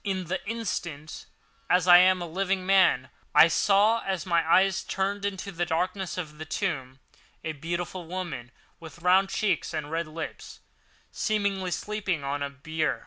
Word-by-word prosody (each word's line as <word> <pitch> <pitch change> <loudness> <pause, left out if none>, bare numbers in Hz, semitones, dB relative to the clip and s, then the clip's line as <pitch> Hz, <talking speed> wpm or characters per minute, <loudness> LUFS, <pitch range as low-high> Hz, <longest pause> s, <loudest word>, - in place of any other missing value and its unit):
In 190 -2 -2
the 180 +2 -4
instant, 170 -9 -5 0.4
as 180 0 +3
I 175 0 +10
am 185 0 +4
a - - -5
living 190 +2 -1
man, 185 -9 +3 0.2
I - - +9
saw, 210 +6 +3
as 190 -4 -2
my 170 -2 +2
eyes 190 -1 +4
were - - -21
turned 200 +1 -1
into 200 0 -4
the 175 -1 -2
darkness 180 +3 -2
of 155 -4 -6
the 160 - -6
tomb, 140 -8 -3 0.5
a 160 - -2
beautiful 170 +3 -5
woman, 165 -9 -5 0.3
with 165 +1 -12
rounded 190 +2 +4
cheeks 195 -6 -1
and 150 0 -4
red 165 0 -2
lips, 160 +1 -8 0.5
seemingly 200 -3 -1
sleeping 190 -3 -2
on 140 +1 -3
a 140 - -2
bier. 155 -2 -2
180 Hz, 165 wpm, -27 LUFS, 160-195 Hz, 0.5 s, I